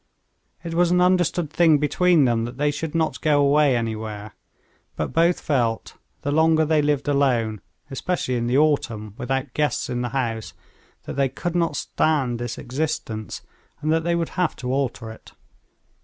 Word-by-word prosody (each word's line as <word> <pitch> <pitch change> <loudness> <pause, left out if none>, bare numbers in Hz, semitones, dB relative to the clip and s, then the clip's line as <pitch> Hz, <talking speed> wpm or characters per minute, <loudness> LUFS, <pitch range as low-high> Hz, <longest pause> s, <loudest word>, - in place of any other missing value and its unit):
It 170 -1 -5
was 175 +1 +3
an 180 0 +3
understood 180 -3 +2
thing 160 -3 +4
between 160 +1 +3
them 115 -2 +1
that 120 +2 -8
they 145 +1 +1
should 155 +2 -5
not 160 -1 0
go 150 -2 +3
away 145 -1 +4
anywhere; 110 -2 -4 0.6
but - - -3
both 170 +2 +3
felt, 120 -6 -1 0.3
the 145 - -1
longer 160 +1 +3
they 155 0 +2
lived 145 -1 0
alone, 120 -7 +1 0.3
especially 135 0 -2
in 120 -1 -1
the 125 +2 +2
autumn, 115 -9 0
without 135 +1 -2
guests 150 -4 -1
in 125 0 -2
the 125 - -2
house, 115 -4 -3 0.5
that - - -7
they 135 -1 +2
could 175 +6 -4
not 170 -1 +1
stand 135 -7 0
this 120 -1 -4
existence, 125 -5 -4 0.4
and 155 +1 -1
that 160 0 +1
they 170 +1 +1
would 170 -1 -1
have 180 -3 -1
to 125 0 -4
alter 130 -4 -2
it. 110 - -14
145 Hz, 170 wpm, -23 LUFS, 120-160 Hz, 0.6 s, thing